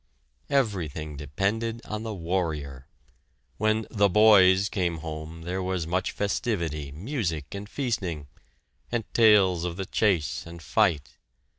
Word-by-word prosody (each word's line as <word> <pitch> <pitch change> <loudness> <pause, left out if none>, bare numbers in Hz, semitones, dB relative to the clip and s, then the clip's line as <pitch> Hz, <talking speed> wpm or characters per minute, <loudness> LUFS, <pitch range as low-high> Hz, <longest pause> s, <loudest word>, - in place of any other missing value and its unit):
Everything 85 - -1
depended 100 +11 -2
on 105 0 -4
the 110 -2 -4
warrior. 80 -7 -3 0.7
When 110 +1 +1
"the 100 -2 +3
boys" 95 -2 +6
came 90 -6 -1
home 80 +1 -7
there 90 +3 -3
was 90 -2 -2
much 90 +3 -1
festivity, 85 - -2
music, 85 - -3
and 100 +1 -7
feasting, 95 - -3 0.6
and 120 -1 0
tales 100 -6 +5
of 90 -1 -3
the 95 - -3
chase 95 -8 0
and 85 0 -9
fight. 80 -6 0
95 Hz, 125 wpm, -26 LUFS, 80-105 Hz, 0.7 s, boys